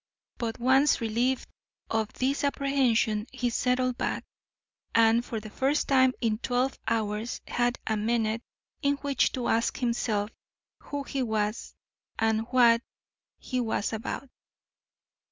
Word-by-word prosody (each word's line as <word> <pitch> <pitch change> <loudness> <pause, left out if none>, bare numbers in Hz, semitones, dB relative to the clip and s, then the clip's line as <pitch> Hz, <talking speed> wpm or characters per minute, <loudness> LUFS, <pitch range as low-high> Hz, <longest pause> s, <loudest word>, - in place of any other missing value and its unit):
But, 230 -2 -2
once 265 +4 +4
relieved 235 +3 0 0.4
of 220 -1 0
this 270 +3 0
apprehension, 255 -6 +1
he 245 -1 -1
settled 250 +1 +1
back, - - -1 0.7
and 230 +1 +5
for 230 -2 -4
the 215 0 -10
first 275 +6 +1
time 260 -2 +4
in 220 -2 +1
twelve 250 +2 0
hours 220 0 -1
had 245 0 +1
a 220 - 0
minute 225 +1 0 0.4
in 285 -1 +2
which 280 -1 +2
to 250 -2 -2
ask 230 +1 +1
himself 230 -4 0 0.5
who 285 -1 -5
he 275 0 -3
was, 215 -2 -2 0.4
and 220 0 +1
what 240 -2 +5 0.6
he 255 - -3
was 225 -2 -1
about. 225 +4 -4
235 Hz, 130 wpm, -28 LUFS, 220-260 Hz, 0.7 s, and